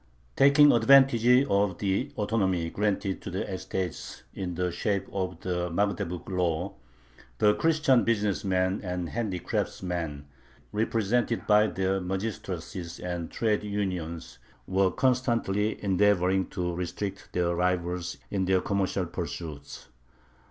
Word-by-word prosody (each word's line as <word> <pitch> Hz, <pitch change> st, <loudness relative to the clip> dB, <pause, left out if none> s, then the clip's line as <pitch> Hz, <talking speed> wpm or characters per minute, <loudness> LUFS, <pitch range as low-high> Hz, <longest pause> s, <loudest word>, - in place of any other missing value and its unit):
Taking 140 Hz, +1 st, +7 dB
advantage 120 Hz, 0 st, +5 dB, 0.2 s
of 100 Hz, -6 st, +1 dB
the 100 Hz, +8 st, -1 dB
autonomy 95 Hz, -6 st, 0 dB
granted 100 Hz, -2 st, -1 dB
to -, -, -6 dB
the 95 Hz, +1 st, -3 dB
estates 95 Hz, -2 st, -5 dB
in 90 Hz, -2 st, -4 dB
the 90 Hz, 0 st, -1 dB
shape 100 Hz, +3 st, -1 dB
of 95 Hz, -3 st, -3 dB
the 90 Hz, -1 st, -2 dB
Magdeburg 100 Hz, -1 st, -2 dB
Law, 90 Hz, 0 st, -1 dB, 0.6 s
the 105 Hz, +8 st, +4 dB
Christian 155 Hz, -4 st, +3 dB
business 105 Hz, -4 st, 0 dB
men 95 Hz, 0 st, 0 dB
and 90 Hz, -2 st, -3 dB
handicraftsmen, 90 Hz, -7 st, -3 dB, 0.5 s
represented 115 Hz, +2 st, 0 dB
by 105 Hz, 0 st, +5 dB
their 95 Hz, -1 st, -1 dB
magistracies 95 Hz, -2 st, -5 dB
and 85 Hz, -2 st, -4 dB
trade 110 Hz, -2 st, 0 dB
unions, 90 Hz, -6 st, -4 dB, 0.3 s
were 95 Hz, 0 st, +2 dB
constantly 115 Hz, -4 st, +1 dB
endeavoring 95 Hz, -1 st, +2 dB
to 90 Hz, -1 st, -3 dB
restrict 90 Hz, +3 st, -5 dB
their 85 Hz, -1 st, +1 dB
rivals 90 Hz, 0 st, -1 dB
in 95 Hz, -2 st, 0 dB
their 95 Hz, 0 st, +3 dB
commercial 100 Hz, -2 st, -1 dB
pursuits. 80 Hz, -4 st, -7 dB
95 Hz, 115 wpm, -28 LUFS, 90-105 Hz, 0.6 s, Taking